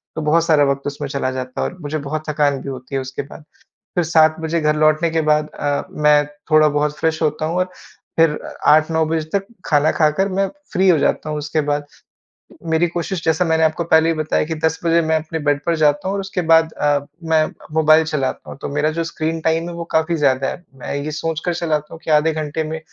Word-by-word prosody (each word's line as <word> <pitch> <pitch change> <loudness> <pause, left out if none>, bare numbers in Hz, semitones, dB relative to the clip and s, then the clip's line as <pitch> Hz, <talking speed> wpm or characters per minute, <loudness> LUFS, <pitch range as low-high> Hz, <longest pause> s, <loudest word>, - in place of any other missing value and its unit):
तो 160 - -3
बहुत 165 +2 +2
सारा 155 -4 +4
वक़्त 140 +1 -4
उसमें 145 0 -4
चला 135 -2 -2
जाता 130 0 -5
है - - 0
और 180 - -14
मुझे 150 +1 -3
बहुत 155 +1 -4
थकान 145 -3 +1
भी 140 - -6
होती 130 +1 -7
है 135 - 0
उसके 130 +1 -5
बाद। 150 +2 -12 0.5
फिर 175 -2 +1
7 155 -1 +4
बजे 165 +1 -1
घर 150 0 +1
लौटने 155 +2 +3
के 160 0 +1
बाद 150 0 +2
अ, 145 -1 -1
मैं 150 -1 +3 0.2
थोड़ा 155 0 +6
बहुत 150 0 -1
फ्रेश 160 0 0
होता 155 0 0
हूँ 170 +2 -2
और 185 0 0 0.5
फिर 165 -1 +5 0.4
8, 155 +1 +5
9 160 0 +2
बजे 160 0 -1
तक 195 -1 0 0.2
खाना 150 +1 +3
खाकर 155 +5 +2
मैं 195 +1 0 0.3
फ्री 190 +1 +3
हो 170 - +5
जाता 155 - 0
हूँ, 150 - -2
उसके 150 +1 -1
बाद। 145 0 -1 0.9
मेरी 160 +2 +3
कोशिश 175 +1 -3
जैसा 160 +2 +2
मैंने 160 -1 +2
आपको 160 +2 0
पहले 160 0 +4
ही 165 - +2
बताया 155 0 0
कि, 160 - -4
10 160 0 -1
बजे 170 0 +4
मैं 160 0 +1
अपने 160 +1 -3
बेड 145 0 +2
पर 170 -1 +2
जाता 150 +3 +2
हूँ 195 - -1
और 200 - -1
उसके 195 -1 -3
बाद 160 0 +5
अ, 145 -1 +1 0.2
मैं 160 -1 +3 0.3
मोबाइल 155 0 +5
चलाता 150 -5 -3
हूँ। - - -9
तो - - -3
मेरा 150 +1 +1
जो 165 - 0
स्क्रीन 160 0 -3
टाइम 165 +2 0
है, - - -7
वो 170 0 -5
काफ़ी 160 +2 +1
ज़्यादा 135 -3 +2
है। 175 - -6
मैं 130 - -6
ये 145 +2 -3
सोचकर 165 +2 -2
चलाता 155 -3 -2
हूँ, 165 - -12
कि - - -4
आधे 155 +1 +4
घंटे 155 0 -3
में 160 +1 -4
155 Hz, 235 wpm, -19 LUFS, 150-165 Hz, 0.9 s, थोड़ा